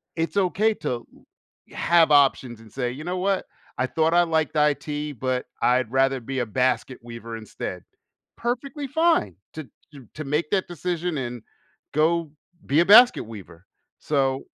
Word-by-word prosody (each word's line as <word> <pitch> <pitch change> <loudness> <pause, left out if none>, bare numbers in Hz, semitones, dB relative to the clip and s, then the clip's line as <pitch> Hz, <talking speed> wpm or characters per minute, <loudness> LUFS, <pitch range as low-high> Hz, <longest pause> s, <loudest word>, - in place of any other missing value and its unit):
it's 165 +4 -2
okay 200 +3 +2
to - - -4
l 120 -1 -4 0.7
have 170 -2 +4
options 135 -5 +3
and 110 -2 -16
say, 125 -2 -2
"You 140 +5 -8
know 180 +2 -3
what? 195 +1 0 0.3
I 130 - +1
thought 160 +4 +1
I 175 - +6
liked 160 -2 0
IT, 150 0 0
but 130 0 -2 0.2
I'd 125 -2 +2
rather 135 0 +2
be 130 +2 -4
a 120 - 0
basket 130 +2 0
weaver 115 -1 -8
instead." 110 -2 -7 0.5
Perfectly 265 +4 -3
fine 320 - +2 0.2
to 155 -4 -8 0.2
to 135 -5 -13
to 155 - -5
make 150 +3 -1
that 190 -2 +1
decision 175 -1 -3
and 120 -3 -5 0.5
go 160 0 +1 0.3
be 145 +3 +2
a - - +2
basket 240 +6 +7
weaver. 100 -5 -12 0.3
So, 135 -2 0
150 Hz, 160 wpm, -24 LUFS, 125-175 Hz, 0.7 s, basket